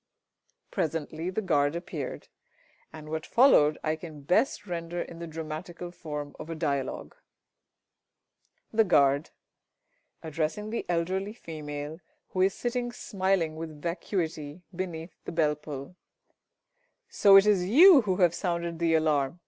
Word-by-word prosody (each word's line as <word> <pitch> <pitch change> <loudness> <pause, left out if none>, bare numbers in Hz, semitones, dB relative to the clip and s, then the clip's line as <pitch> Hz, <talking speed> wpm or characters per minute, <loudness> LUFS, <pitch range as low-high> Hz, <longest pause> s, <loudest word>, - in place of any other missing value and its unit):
Presently 160 +1 -2
the 215 +4 -2
Guard 145 -4 +2
appeared, 165 -5 -5 0.6
and 155 -1 -10
what 160 0 -3
followed 195 - +5
I 155 0 0
can 155 -2 -10
best 205 - +1
render 175 -1 -4
in 170 -1 -6
the 170 - -6
dramatical 165 +2 -6
form 150 -4 -6
of 160 - -8
a 165 - -4
dialogue: 140 -4 -2 1.6
The 225 0 +5
Guard 140 -6 +3 0.9
(addressing 160 +7 -3
the 230 - -3
~Elderly 185 +4 -1
Female~, 150 -5 -7 0.3
who 185 - -1
is 190 +1 +3
sitting 240 0 -2
smiling 190 -7 -1
with 160 -2 -7
vacuity 170 -2 -3
beneath 170 -2 -5
the - - -5
bell 155 -3 +2
pull). 150 +1 -8 1.1
So 200 -1 +5
it 195 +1 +8
is 195 -4 +3
you 320 - +9
who 195 -5 0
have 175 -3 +3
sounded 170 -2 -2
the 165 -1 +3
alarm! 155 -1 +1
165 Hz, 130 wpm, -28 LUFS, 155-185 Hz, 1.6 s, you